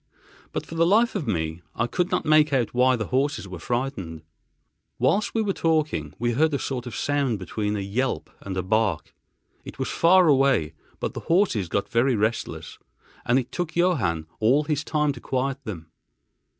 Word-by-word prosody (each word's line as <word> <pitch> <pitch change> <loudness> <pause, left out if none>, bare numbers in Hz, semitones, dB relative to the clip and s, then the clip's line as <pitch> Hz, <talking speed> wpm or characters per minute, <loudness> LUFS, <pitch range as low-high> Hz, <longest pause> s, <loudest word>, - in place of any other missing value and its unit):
But - - -4
for - - -10
the 165 0 +2
life 225 +5 +4
of 185 -9 -3
me 80 -1 -2
I 115 - +1
could 180 +8 -1
not - - -1
make 155 0 +5
out 125 -5 0
why 125 +1 +4
the 110 -4 -4
horses 135 -4 0
were 90 -2 -8
frightened. 105 - -3 0.7
Whilst 210 +3 +1
we 225 - +2
were 200 -2 0
talking, 155 - 0
we 120 +1 0
heard 150 +5 +2
a - - +1
sort 130 -3 -4
of 120 - -6
sound 140 -5 0
between 105 +1 -3
a 100 - -2
yelp 120 +7 -2
and 95 -1 -5
a 90 - -1
bark. 100 -4 0 0.5
It - - -10
was - - -2
far 180 +1 +5
away; 135 - +3 0.3
but - - -3
the - - -5
horses 165 - +2
got 100 - -1
very 120 +2 +2
restless, 110 +2 -2 0.5
and 120 - +4
it 130 -2 -2
took 175 -2 -4
Johann 125 - +1
all 130 +7 +3
his 150 -1 -1
time 150 -1 +1
to 125 - -11
quiet 135 +1 -2
them. 80 -7 -7
130 Hz, 190 wpm, -25 LUFS, 105-155 Hz, 0.7 s, make